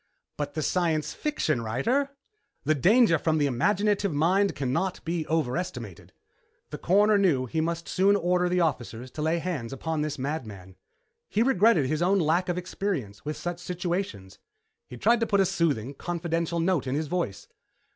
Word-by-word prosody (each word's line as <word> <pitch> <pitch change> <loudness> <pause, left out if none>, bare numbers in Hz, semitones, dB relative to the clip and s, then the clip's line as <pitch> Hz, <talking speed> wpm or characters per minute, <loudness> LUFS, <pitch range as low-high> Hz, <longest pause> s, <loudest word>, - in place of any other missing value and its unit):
"But 145 0 -4
the 155 - -1
science 160 -2 0
fiction 160 - -1
writer?" 185 - 0 0.5
"The 155 - +2
danger 180 - +4
from 160 0 +1
the 145 - +2
imaginative 200 - +1
mind 185 +7 +2
cannot 165 +9 -2
be 165 -1 -2
overestimated." 125 - -3 0.6
The - - -6
Coroner 205 +3 +4
knew 155 -10 +2
he 160 +6 -1
must 170 +1 -2
soon 195 +2 +3
order 180 -1 +1
the 180 0 +2
officers 125 -5 -2
to 150 - -6
lay 160 +2 +1
hands 160 -9 -3
upon 155 +3 -3
this 150 -1 -2
madman. 110 - -5 0.5
He 220 - +2
regretted 220 - +4
his 155 +4 -1
own 190 +3 +3
lack 175 +1 +1
of 175 - -1
experience 175 - -4
with 150 +1 -3
such 175 0 -4
situations. 175 - -4 0.5
He 125 - -9
tried 235 - +3
to 230 - 0
put 200 - +2
a 195 - +5
soothing, 140 -8 0
confidential 170 +1 -2
note 165 -5 +1
into 130 +2 0
his 155 0 -2
voice. 165 - -3
165 Hz, 165 wpm, -27 LUFS, 140-185 Hz, 0.6 s, a